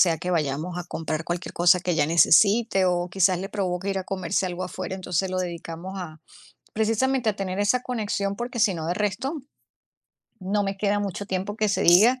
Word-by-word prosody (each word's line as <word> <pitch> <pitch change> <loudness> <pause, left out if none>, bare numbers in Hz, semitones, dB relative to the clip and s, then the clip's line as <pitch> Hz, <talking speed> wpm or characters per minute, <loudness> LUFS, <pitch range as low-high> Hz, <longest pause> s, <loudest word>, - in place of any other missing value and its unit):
sea 170 -3 +4
que 180 +4 -4
vayamos 160 +2 -1
a 175 - -5
comprar 160 -2 -4
cualquier 175 +1 -4
cosa 175 +1 +4
que 180 - -2
ella 160 -4 +2
necesite, 195 +5 +4
o 175 0 0
quizás, 185 -1 +2
le 195 +1 -6
provoque 190 -1 -2
ir 195 - -1
a 185 - -5
comerse 185 0 -1
algo 180 +1 -4
afuera. 185 +1 -5
Entonces, 185 0 -2
lo 185 - -2
dedicamos 175 +1 -5
a 155 -3 -8 0.5
precisamente 225 +2 +1
a 200 - -8
tener 190 -1 -3
esa 205 +5 +2
conexión, 205 -5 -2
porque 240 +1 -5
si 205 -5 +3
no, 160 -1 -5
de 175 - 0
resto, 210 - -2 1.0
no 200 +2 -1
me 195 0 -3
queda 205 +1 +1
mucho 200 0 -4
tiempo 195 +2 -3
que 215 -1 +1
se - - 0
diga, 220 +9 +6
190 Hz, 200 wpm, -25 LUFS, 175-205 Hz, 1.0 s, diga